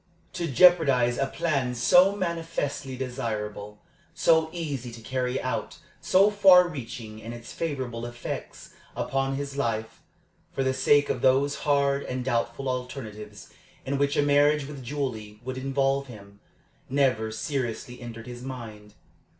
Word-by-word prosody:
To 170 - -2
jeopardize 140 -6 +5
a 135 - +1
plan 135 -5 -1
so 180 +11 +5
manifestly 165 -7 -3
desirable, 105 -5 -5 0.3
so 160 -1 +3
easy 145 -8 -4
to 115 - -10
carry 125 +2 -2
out, 130 - -3 0.2
so 195 +3 +4
far 190 -3 +7
reaching 115 -7 -7
in 115 +1 -7
its 120 0 -10
favorable 130 -7 -3
effects 120 0 -7 0.2
upon 135 +1 -1
his 140 0 -5
life, 115 -4 -2 0.5
for 135 - -1
the 130 0 +1
sake 145 +2 +3
of - - -3
those 135 +2 +3 0.2
hard 140 -1 +3
and 130 -2 -4
doubtful 120 +1 -1
alternatives 110 -5 -6 0.3
in 140 +1 -1
which 140 0 +1
a - - +4
marriage 145 0 +3
with 140 -1 -8
Julie 115 -6 -4
would 130 0 -4
involve 135 +1 0
him, 100 -4 -13 0.5
never 130 -5 +1
seriously 125 0 -4
entered 115 -1 -8
his 120 -1 -8
mind. 110 -5 -8
130 Hz, 140 wpm, -26 LUFS, 120-145 Hz, 0.5 s, far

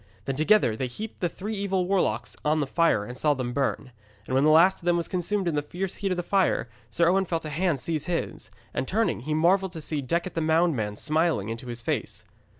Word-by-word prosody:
Then 135 - -2
together 155 - +3
they 130 +3 -2
heaped 210 - -7
the 175 - 0
three 205 +6 -6
evil 195 -3 0
warlocks 120 - 0
on 155 +1 +2
the 145 - +1
fire 135 -7 +2
and 125 - -7
saw 145 +2 +2
them 125 -2 -3
burn. 135 -1 -1 0.3
And - - -5
when 135 +1 +3
the 155 - +5
last 170 +5 +5
of - - -15
them 175 0 +3
was 170 - -2
consumed 185 +1 -1
in 170 - +1
the 145 - +1
fierce 180 +5 -5
heat 200 - -1
of 185 - -1
the 175 - -1
fire, 190 - +1 0.2
Sir 170 0 +2
Owen 190 +2 +3
felt 165 -2 -2
a 155 - -5
hand 165 -1 0
seize 155 +2 -3
his, 170 -10 -3 0.2
and, 130 - -2
turning, 220 - +1
he 150 +5 -2
marvelled 185 +3 +2
to 165 - -6
see 150 -1 -2
Decet 170 +7 -2
the 165 - -1
Moundman 155 -10 +1
smiling 155 - 0
into 115 +2 -6
his 120 -1 -6
face. - - -3
165 Hz, 240 wpm, -26 LUFS, 135-180 Hz, 0.3 s, the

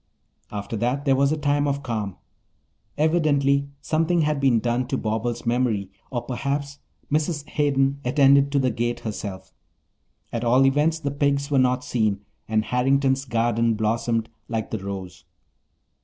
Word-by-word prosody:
After 105 +2 -5
that 125 +6 -1
there 135 -2 +4
was 140 +1 +3
a 155 - 0
time 145 -1 +1
of 140 0 -1
calm. 110 -6 -3 0.8
Evidently 145 -3 +2
something 165 +3 +1
had 150 -2 +1
been 130 -4 +3
done 120 +2 -1
to 135 - -1
Bobbles' 115 +2 -2
memory 115 -5 0 0.2
or 120 -2 -3
perhaps 140 +2 -3 0.3
Mrs. 150 0 0
Hayden 140 -2 +1
attended 140 +1 +4
to 140 - +1
the 130 -2 +2
gate 120 +1 -2
herself. 105 -3 -6 0.8
At 115 0 -2
all 125 +3 +4
events 150 +4 +2
the 145 -3 -3
pigs 140 0 0
were 140 - +4
not 125 0 +2
seen 110 -5 0 0.3
and 110 0 +1
Harrington's 135 +1 +1
garden 115 -1 +1
blossomed 115 +1 0 0.2
like 115 -2 -3
the 110 - -2
rose. 95 -2 -6
130 Hz, 150 wpm, -24 LUFS, 115-140 Hz, 0.8 s, there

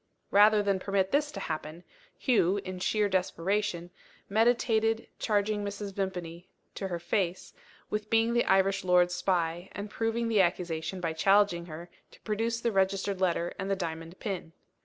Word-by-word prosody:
Rather 210 +1 +6
than 200 -2 +1
permit 195 0 0
this 295 +1 +1
to - - -6
happen, 155 +1 -5 0.3
Hugh 205 -7 +2
(in 185 -1 -5
sheer 210 +3 +1
desperation) 185 -1 -1 0.4
meditated 225 0 +2
charging 210 -1 0
Mrs. 200 0 -5
Vimpany, 180 -2 -4 0.2
to 195 - -4
her 175 -2 -3
face, 175 +1 -2 0.4
with 210 0 -3
being 225 +1 +3
the 240 - +3
Irish 195 0 +3
lord's 180 -1 +4
spy, 175 -1 -1
and 205 +1 -6
proving 230 +1 -1
the 220 -3 +4
accusation 175 0 -1
by 165 -2 -1
challenging 195 0 +3
her 165 +2 -8 0.2
to - - -18
produce 230 +2 -1
the 235 0 0
registered 195 0 0
letter 175 -2 +1
and 195 0 -3
the 195 - +2
diamond 165 -1 -6
pin. 185 -6 -5
195 Hz, 160 wpm, -29 LUFS, 175-210 Hz, 0.4 s, Rather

